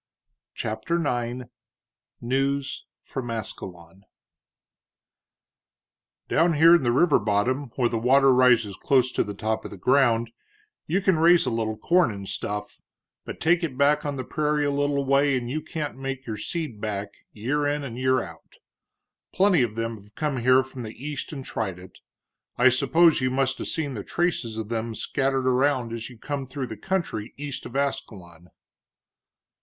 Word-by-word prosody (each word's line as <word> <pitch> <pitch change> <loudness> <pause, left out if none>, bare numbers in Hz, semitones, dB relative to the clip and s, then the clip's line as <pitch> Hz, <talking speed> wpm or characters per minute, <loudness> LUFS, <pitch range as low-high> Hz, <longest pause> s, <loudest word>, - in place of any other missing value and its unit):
CHAPTER 110 +10 -2
IX 120 -1 -2 0.8
NEWS 135 +3 -1 0.2
FROM 130 -3 -5
ASCALON 95 -5 -7 2.2
"Down 165 +1 +3
here 160 +3 +7
in - - -5
the 120 -2 +1
river 145 +4 +4
bottom, 115 +6 0
where 125 -3 +2
the 115 -1 -2
water 135 +3 +5
rises 120 -5 +4
close 130 0 +2
to - - +1
the 105 - -7
top 110 +1 -2
of - - -7
the - - -10
ground, 120 +1 +2 0.6
you 180 +6 +1
can 190 -4 +2
raise 170 +1 +5
a - - 0
little 110 -1 -2
corn 175 -4 +3
and 100 -1 -7
stuff, 105 +2 -5 0.4
but - - -7
take 175 +2 +3
it 140 -6 -3
back 145 +2 +3
on 145 -1 -3
the 130 - -4
prairie 150 +2 0
a 145 - +1
little 140 0 0
way 140 0 +3
and 120 -1 -4
you 155 +3 -2
can't 150 -6 -5
make 135 -1 -5
your 110 - -4
seed 120 -1 -4
back, 100 -2 -4 0.2
year 145 +7 -1
in 145 0 -1
and 125 -3 -6
year 130 -1 +2
out. - - -13 0.8
Plenty 190 -5 +4
of 115 -3 -1
them 115 0 -3
have 105 +1 -20
come 150 -3 -1
here 130 +2 +4
from 130 0 -9
the 110 -1 -7
East 145 +2 -5
and 135 -4 -7
tried 95 -6 -3
it 90 0 -14 0.6
I 125 +2 +6
suppose 140 +5 +4
you 130 - +1
must 135 0 0
'a' - - -4
seen 150 -4 -2
the 105 -4 -5
traces 150 - -1
of 110 -1 -5
them 115 -1 -3
scattered 135 +1 -1
around 130 -2 +1
as 115 0 -5
you 120 - -13
come 140 +2 -4
through 130 +1 -4
the 110 - -7
country 160 - -3
east 145 -1 -5
of 120 - -12
Ascalon." 90 -11 -4
130 Hz, 170 wpm, -25 LUFS, 115-145 Hz, 2.2 s, here